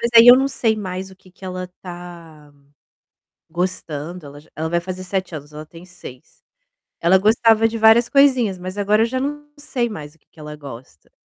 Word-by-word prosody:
Mas 235 - -1
aí 230 +1 +9
eu 245 +1 +10
não 270 +1 +1
sei 225 -5 0
mais 190 -1 -6
o 190 - -16
que 185 - -21
que 190 +1 -16
ela 185 -1 -5
tá 170 -4 -11 1.0
gostando, 170 -2 -4
ela 145 +1 -11
já 150 - -22
ela 160 +1 -3
vai 170 +1 +1
fazer 185 +1 -7
7 185 -2 -3
anos 150 0 -10
ela 155 +1 -8
tem 165 +3 -14
6. 175 -8 -14 0.6
Ela 185 +3 +4
gostava 225 +2 +3
de 230 - -5
várias 225 +2 +5
coisinhas, 255 -9 +3
mas 185 +2 -7
agora 210 +2 +2
eu - - +3
já 260 +2 -3
não 295 +2 -4
sei 265 -5 -2
mais 150 -9 -9
o - - -29
que - - -42
que - - -27
ela 150 0 -8
gosta. 130 - -12
185 Hz, 210 wpm, -20 LUFS, 160-225 Hz, 1.0 s, eu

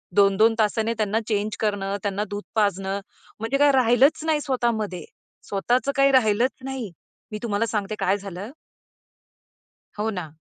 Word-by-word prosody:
2-2 205 +3 +5
तासाने 220 +1 +1
त्यांना 215 +1 +1
चेंज 210 -1 -1
करणं, 200 -2 -1
त्यांना 205 +1 -1
दूध 205 0 -5
पाजणं, 195 -2 0 0.4
म्हणजे 225 +5 -1
काय 290 0 +5
राहिलंच 260 +4 +4
नाही 310 -2 +1
स्वतः 250 -4 0
मध्ये. 210 -5 -4 0.4
स्वतःच 245 +7 0
काही 275 0 +4
राहिलंच 240 0 +3
नाही. 260 -8 -5 0.4
मी 210 - -4
तुम्हाला 220 0 0
सांगते 210 -1 -2
काय 195 +2 +2
झालं 195 +3 -8 1.5
हो 220 +1 0
ना. 175 -7 -5
215 Hz, 145 wpm, -24 LUFS, 200-245 Hz, 1.5 s, 2-2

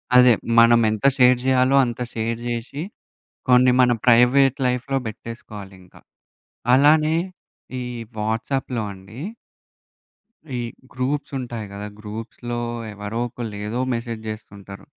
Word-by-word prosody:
అదే, 125 -1 +8 0.2
మనమెంత 115 -1 +5
షేర్ 125 -1 +6
జేయాలో, 130 0 +3
అంత 120 +1 -5
షేర్ 115 +1 -2
జేషి, 120 +4 -4 0.7
కొన్ని 125 0 +6
మన 125 -1 +5
ప్రైవేట్ 125 +3 +5
లైఫ్‌లో 125 +2 -1
బెట్టేసుకోవాలింక. 100 -4 -9 0.8
అలానే 155 +3 +4 0.7
ఈ - - -3 0.4
వాట్సాప్‌లో 115 +3 -2
అండీ... 100 +7 -12 1.4
ఈ - - -2 0.3
గ్రూప్సుంటాయి 130 -4 -3
గదా! 100 +1 -6
గ్రూప్స్‌లో 115 +3 -6 0.3
ఎవరోకళ్ళు, 115 +2 -4
ఏదో 120 +4 -3
మెసేజ్ 115 -1 -4
జేస్తుంటారు. 100 -2 -9
120 Hz, 95 wpm, -22 LUFS, 110-125 Hz, 1.4 s, అదే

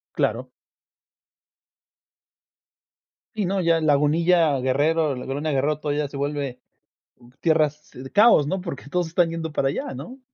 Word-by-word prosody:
Claro. - - -1 2.9
Sí 210 -3 -1
no, 190 +1 0
ya 165 -1 +2
Lagunilla, 155 +1 +3
Guerrero, 145 +3 +1
la 125 - -7
Colonia 145 +4 -3
Guerrero 145 +2 0
todavía 145 -1 -2
se 140 - -8
vuelve 140 -3 -3 0.8
tierras 155 -2 +1
de 130 +1 -9
caos, 205 - +5
¿no? 190 +4 -2
Porque, 145 -6 -7
todos 180 +1 -1
están 170 +1 +1
yendo 165 -1 -4
para 140 -2 0
allá, 270 - -3
¿no? 255 +2 -9
155 Hz, 135 wpm, -23 LUFS, 140-170 Hz, 2.9 s, caos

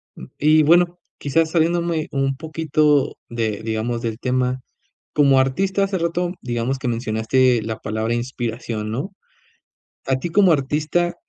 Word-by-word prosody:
mm, - - -9
y 155 +1 +5
bueno, 175 +3 +4 0.2
quizás 160 +3 0
saliéndome 170 -1 +1
un 135 0 0
poquito 155 -2 +1
de, 110 -3 -2
digamos, 115 +1 -2
del 115 -1 -4
tema, 125 0 -1 0.5
como 140 -3 +4
artista 190 +10 +1
hace 195 -1 -1
rato, 175 +1 -1
digamos 120 +2 -2
que 130 - -4
mencionaste 115 +2 +1
la 110 0 -4
palabra 110 +2 -2
inspiración, 120 -3 -4
¿no?, 140 - -4 1.0
a 130 -1 +2
ti 150 +6 -4
como 185 0 +5
artista 155 +5 0
135 Hz, 140 wpm, -21 LUFS, 120-165 Hz, 1.0 s, y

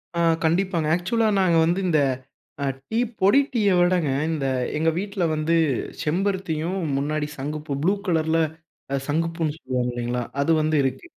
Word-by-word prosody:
ஆ - - 0 0.3
கண்டிப்பாங்க. 170 -1 +1
ஆக்சுவலா 220 +6 +1
நாங்க 170 -3 +3
வந்து 175 +3 +1
இந்த 155 -3 +3 0.9
டீ, 225 - 0 0.2
பொடி 200 +8 +6
டீய 210 -4 +3
விடங்க, 175 -4 +2 0.2
இந்த 155 -4 -1 0.3
எங்க 160 +1 +2
வீட்ல 200 -2 -3
வந்து 155 +2 +1 0.5
செம்பருத்தியும் 180 0 -1 0.2
முன்னாடி 150 +1 -1
சங்குப்பூ 150 +1 -4
ப்ளூ 190 +5 +3
கலர்ல 160 -2 +1 0.7
சங்குப்பூன்னு 165 0 -1
சொல்லுவாங்க 125 -5 -2
இல்லைங்களா? 120 0 -2 0.2
அது 140 +4 +3
வந்து 155 0 +1
இருக்கு. 135 -1 -2
165 Hz, 135 wpm, -24 LUFS, 150-185 Hz, 0.9 s, பொடி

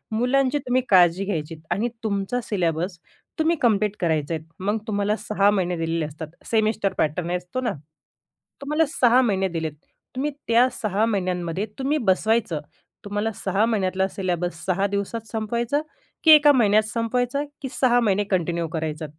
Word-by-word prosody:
मुलांची 270 +4 +2
तुम्ही 255 +1 +2
काळजी 180 0 +5
घ्यायची 165 -5 -3 0.2
आणि 225 +5 0
तुमचा 200 +3 -1
सिलेबस 175 -2 -1 0.4
तुम्ही 320 +2 +3
कम्प्लीट 210 -3 +2
करायचे 160 -3 0
आहेत. 160 0 -7
मग 205 +3 0
तुम्हाला 205 0 0
6 205 -2 +2
महिने 180 -3 0
दिलेले 165 -1 -1
असतात. 155 +1 -7 0.2
सेमिस्टर 215 -3 +1
पॅटर्न 165 +3 0
असतो 180 +8 -5
ना, 235 -5 -1 0.9
तुम्हाला 300 +3 +1
6 255 -4 +4
महिने 195 -5 +1
दिलेत. 160 -3 -3 0.4
तुम्ही 290 +3 -1 0.2
त्या 235 +2 +5
6 215 0 +1
महिन्यांमध्ये 185 -3 -1
तुम्ही 275 +3 +1
बसवायचं. 205 -4 +1 0.5
तुम्हाला 205 +2 -2
6 195 +3 +2
महिन्यातला 190 -4 0
सिलेबस 180 -3 -3
6 195 +2 +1
दिवसात 205 +3 -3
संपवायचा, 235 +5 -1 0.4
की 320 - +7
1का 295 -1 +8
महिन्यात 215 -5 +4
संपवायचा, 245 +5 -1 0.2
की 270 - -4
6 245 -1 +5
महिने 205 -3 +2
कंटिन्यू 170 -2 0
करायचा. 155 -1 -3
205 Hz, 145 wpm, -23 LUFS, 180-235 Hz, 0.9 s, 1का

